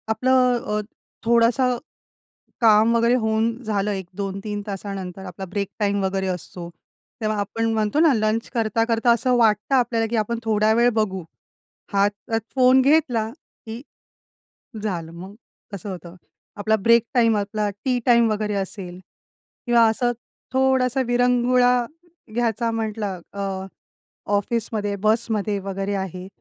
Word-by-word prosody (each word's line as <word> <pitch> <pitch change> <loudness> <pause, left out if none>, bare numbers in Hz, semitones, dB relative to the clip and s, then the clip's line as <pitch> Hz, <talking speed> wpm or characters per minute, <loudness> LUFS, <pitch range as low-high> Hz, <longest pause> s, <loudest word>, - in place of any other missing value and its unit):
आपलं 250 +1 +2 0.2
अ, - - 0 0.4
थोडासं 235 +2 +3 0.8
काम 220 0 +5
वगैरे 235 +1 +3
होऊन 220 -1 +1
झालं, 210 -2 -1
1, 190 -3 -4
2-3 200 +1 -4
तासानंतर, 195 -2 -6
आपला 185 +1 -7
ब्रेक 200 +1 -3
टाईम 200 -2 0
वगैरे 190 0 -1
असतो, 180 -1 -5 0.5
तेव्हा 215 -1 -1
आपण 225 +3 -3
म्हणतो 215 +6 +1
ना, 320 -3 +5
लंच 215 0 0
करता-करता 225 +1 +1
असं 250 +2 +2
वाटतं 225 +2 +2
आपल्याला 235 -3 +2
की 235 - 0
आपण 225 +2 -1
थोड्या 215 -1 +2
वेळ 235 +1 +4
बघू. 200 -4 -1 0.7
हातात 205 +3 0 0.2
फोन 255 0 +5
घेतला 260 -6 +2
की 230 -4 -12 1.0
झालं 175 -6 -3
मग, 185 +4 -10 0.4
कसं 200 +1 -6
होतं. 180 -2 -8 0.4
आपला 215 +1 +1
ब्रेक 230 +2 +4
टाईम, 230 -3 +4
आपला 210 +1 -1 0.2
टि 250 -2 +1
टाईम 235 -2 +5
वगैरे 210 0 -1
असेल 190 -2 -5 0.7
किंवा 240 -2 +5
असं, 240 +2 0 0.4
थोडासा 260 0 +2
विरंगुळा 245 0 +3 0.6
घ्यायचा 230 0 0
म्हटलं 215 -4 -3
अ, 195 -1 -4 0.7
ऑफिसमध्ये, 205 -1 -1
बसमध्ये 215 -2 +1
वगैरे 195 +1 -3
आहे. 185 -1 -5
220 Hz, 125 wpm, -22 LUFS, 200-235 Hz, 1.0 s, काम